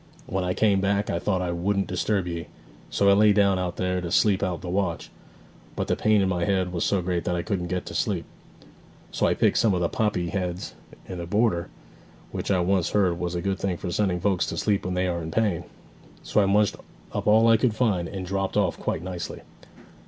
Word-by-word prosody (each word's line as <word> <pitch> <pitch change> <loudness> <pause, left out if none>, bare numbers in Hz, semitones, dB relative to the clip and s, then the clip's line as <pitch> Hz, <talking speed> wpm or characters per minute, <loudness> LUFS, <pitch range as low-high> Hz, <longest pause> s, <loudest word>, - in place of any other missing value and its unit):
When 95 -7 -2
I 90 0 -1
came 100 -3 +3
back 100 +1 0
I 85 - -1
thought 95 0 0
I 90 - -1
wouldn't 95 +3 0
disturb 95 +1 -1
ye: 85 -1 -4 0.4
so 100 - +1
I 100 - +7
lay 105 +1 +5
down 100 -2 +3
out 90 -1 -2
there, 90 0 -1
to 85 - -4
sleep 100 0 +3
out 90 -3 -2
the - - -7
watch; 95 +2 -2 0.6
but - - -1
the - - +1
pain 105 -1 +3
in 95 - +2
my 90 -2 0
head 95 -2 +1
was 85 - -1
so 100 -3 +1
great 85 -1 -1
that 90 - 0
I 85 - -2
couldn't 95 -5 -2
get 90 0 -3
to - - -7
sleep; - - -1 0.9
so - - +1
I - - +2
picked - - +2
some 110 -5 +3
of - - 0
the 85 -1 0
poppy 105 -6 0
heads 90 -1 -3 0.3
in 90 - -6
the 85 - -5
border, 100 -3 +1 0.6
which - - -4
I 95 -3 +3
once 90 -2 +1
heard 90 -4 +1
was 90 0 -2
a 85 - -3
good 95 -1 -1
thing 95 -3 -1
for 90 - -5
sending 90 -1 0
folks 95 -1 +1
to - - -4
sleep 100 -4 0
when 90 0 -2
they 90 +1 +1
are 85 -1 -1
in 80 - -5
pain. 90 -3 0 0.6
So 105 - +2
I 100 - +2
munched 105 +1 +2 0.4
up - - -3
all 110 +2 +6
I 115 0 +6
could 110 0 +1
find, 105 -8 +1
and 95 0 -5
dropped 95 +1 -2
off 100 -4 +1
quite - - -2
nicely.' 90 -1 -6
95 Hz, 235 wpm, -25 LUFS, 90-100 Hz, 0.9 s, I